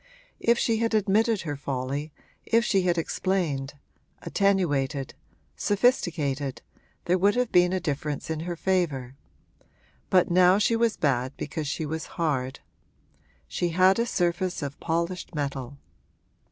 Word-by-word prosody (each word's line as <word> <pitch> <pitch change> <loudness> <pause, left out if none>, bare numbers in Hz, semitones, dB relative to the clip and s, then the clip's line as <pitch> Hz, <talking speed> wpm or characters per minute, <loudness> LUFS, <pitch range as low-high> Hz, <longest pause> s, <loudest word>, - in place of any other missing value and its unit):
If 235 0 +3
she 230 -2 +1
had 230 0 0
admitted 215 +1 +2
her 145 -4 -4
folly, 140 +2 -3 0.3
if 230 +1 +2
she 195 -3 +2
had 175 -1 +1
explained, 160 -5 -1 0.5
attenuated, 145 -9 0 0.4
sophisticated, 160 - 0 0.4
there 180 +1 +2
would 200 +3 +3
have 250 -1 0
been 180 0 +5
a 185 - 0
difference 150 -3 -3
in 160 - -2
her 175 +2 -4
favour; 155 -9 -1 0.9
but 180 -2 +3
now 180 +1 +6
she 215 +2 +2
was 230 -1 +1
bad 130 -2 0
because 150 +1 -4
she 155 +2 -2
was 160 +1 -4
hard. 140 -6 -1 0.9
She 175 - -1
had 185 +4 +4
a 235 - +1
surface 175 -3 -1
of 140 0 -5
polished 170 +1 -2
metal. 140 -2 -4
170 Hz, 135 wpm, -26 LUFS, 145-190 Hz, 0.9 s, now